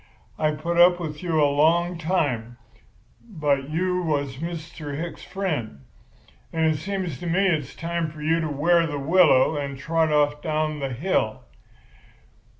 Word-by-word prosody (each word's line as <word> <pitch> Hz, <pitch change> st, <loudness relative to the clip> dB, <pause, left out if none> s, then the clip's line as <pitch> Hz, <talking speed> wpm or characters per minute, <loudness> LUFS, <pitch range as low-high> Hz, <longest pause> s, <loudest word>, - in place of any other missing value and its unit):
I've 155 Hz, -1 st, +1 dB
put 170 Hz, +3 st, -1 dB
up 175 Hz, 0 st, +6 dB
with 150 Hz, -3 st, -5 dB
you 170 Hz, -3 st, 0 dB
a 150 Hz, -, +5 dB
long 165 Hz, +5 st, +2 dB
time 135 Hz, -9 st, -1 dB, 0.8 s
because 140 Hz, -2 st, +1 dB
you 180 Hz, +3 st, 0 dB
was 145 Hz, -5 st, -2 dB
Mr. 155 Hz, -2 st, -6 dB
Hicks's 170 Hz, +2 st, -6 dB
friend; 150 Hz, -, -4 dB, 0.7 s
but 165 Hz, -1 st, -1 dB
it 155 Hz, -1 st, +2 dB
seems 185 Hz, -3 st, -4 dB
to 175 Hz, -, -6 dB
me 185 Hz, +4 st, +2 dB
it's 155 Hz, -8 st, 0 dB
time 170 Hz, -1 st, -2 dB
for 150 Hz, -1 st, -10 dB
you 165 Hz, +2 st, +2 dB
to 160 Hz, -2 st, -2 dB
wear 165 Hz, +4 st, +2 dB
the 145 Hz, -2 st, -4 dB
willow 155 Hz, -1 st, +4 dB
and 140 Hz, -1 st, -4 dB
trot 165 Hz, +2 st, 0 dB
off 150 Hz, 0 st, +2 dB
down 155 Hz, -1 st, -1 dB
the 135 Hz, -1 st, -2 dB
hill. 125 Hz, -, -1 dB
155 Hz, 155 wpm, -24 LUFS, 145-170 Hz, 0.8 s, up